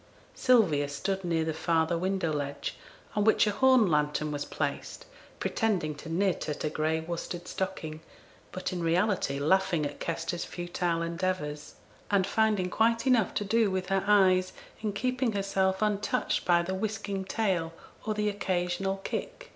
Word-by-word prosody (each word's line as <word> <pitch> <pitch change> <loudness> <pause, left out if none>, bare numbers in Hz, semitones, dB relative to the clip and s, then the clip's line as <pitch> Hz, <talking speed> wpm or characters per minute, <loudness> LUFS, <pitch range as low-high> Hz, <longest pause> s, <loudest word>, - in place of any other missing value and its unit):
Sylvia 180 - +3
stood 190 +7 -2
near 165 -2 0
the 160 - -1
farther 160 +1 +1
window 185 -2 0
ledge, 140 -1 -3 0.4
on 210 - +2
which 220 +1 +5
a 210 - +1
horn 260 +1 +5
lantern 150 -2 +1
was 145 -1 -3
placed, - - -4 0.3
pretending 195 -9 0
to 145 +2 -10
knit 180 0 0
at 150 - -3
a 150 - -1
gray 155 +1 0
worsted 170 +1 -5
stocking, 160 -5 -4 0.5
but 185 0 -4
in 180 - -3
reality 170 -3 +1
laughing 170 +1 +2
at 145 - -5
Kester's 170 +1 -3
futile 175 -1 -2
endeavours, 170 -4 -3 0.3
and 200 -2 +3
finding 210 -3 +1
quite 230 +1 +2
enough 245 -6 +3
to 205 - -1
do 220 +1 +3
with 185 -1 -2
her 195 -1 +1
eyes, 185 -3 +4 0.3
in 215 -1 -1
keeping 250 +2 0
herself 195 0 0
untouched 210 -1 0
by 170 -1 +4
the 185 +2 -3
whisking 200 -1 -3
tail, 190 -5 -1 0.3
or 215 -1 -2
the 210 0 0
occasional 190 -1 -1
kick. - - -5
185 Hz, 155 wpm, -29 LUFS, 165-205 Hz, 0.5 s, which